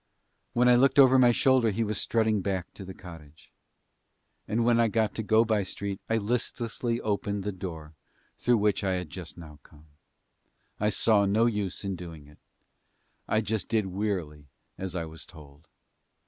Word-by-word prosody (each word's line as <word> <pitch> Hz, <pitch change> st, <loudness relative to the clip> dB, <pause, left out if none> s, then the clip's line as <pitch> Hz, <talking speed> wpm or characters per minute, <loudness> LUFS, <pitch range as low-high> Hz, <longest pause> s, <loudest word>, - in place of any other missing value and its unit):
When 125 Hz, +1 st, +3 dB
I 125 Hz, -, +7 dB
looked 130 Hz, +4 st, +4 dB
over 130 Hz, -1 st, +7 dB
my 120 Hz, -1 st, +6 dB
shoulder 130 Hz, -1 st, +3 dB
he 110 Hz, +3 st, -1 dB
was 105 Hz, -2 st, -2 dB
strutting 110 Hz, -3 st, +1 dB
back 95 Hz, -2 st, -3 dB
to 100 Hz, -, -10 dB
the 95 Hz, 0 st, -8 dB
cottage. 80 Hz, -4 st, -13 dB, 1.0 s
And 115 Hz, +2 st, 0 dB
when 120 Hz, -1 st, +4 dB
I 115 Hz, -, +4 dB
got 110 Hz, 0 st, 0 dB
to -, -, -3 dB
Go 110 Hz, +2 st, +3 dB
by 110 Hz, -2 st, +1 dB
Street 100 Hz, +1 st, -5 dB
I 115 Hz, -, +2 dB
listlessly 115 Hz, +1 st, -2 dB
opened 100 Hz, -1 st, -2 dB
the 105 Hz, -, -2 dB
door 80 Hz, -5 st, -8 dB, 0.4 s
through 120 Hz, -1 st, +2 dB
which 105 Hz, -1 st, +1 dB
I 95 Hz, -1 st, +1 dB
had 90 Hz, -4 st, -4 dB
just 90 Hz, -2 st, -9 dB
now 75 Hz, -3 st, -12 dB
come. 75 Hz, +4 st, -20 dB, 0.9 s
I 105 Hz, -, +2 dB
saw 105 Hz, 0 st, +3 dB
no 110 Hz, +4 st, +3 dB
use 105 Hz, -5 st, -2 dB
in 100 Hz, -1 st, -3 dB
doing 85 Hz, -4 st, -10 dB
it, 75 Hz, +1 st, -19 dB, 0.9 s
I 110 Hz, -, +2 dB
just 110 Hz, -2 st, -3 dB
did 110 Hz, -3 st, +1 dB
wearily 90 Hz, -7 st, -3 dB, 0.3 s
as 95 Hz, -1 st, -6 dB
I 85 Hz, -2 st, -2 dB
was 80 Hz, 0 st, -10 dB
told. 75 Hz, -1 st, -15 dB
100 Hz, 175 wpm, -28 LUFS, 90-115 Hz, 1.0 s, I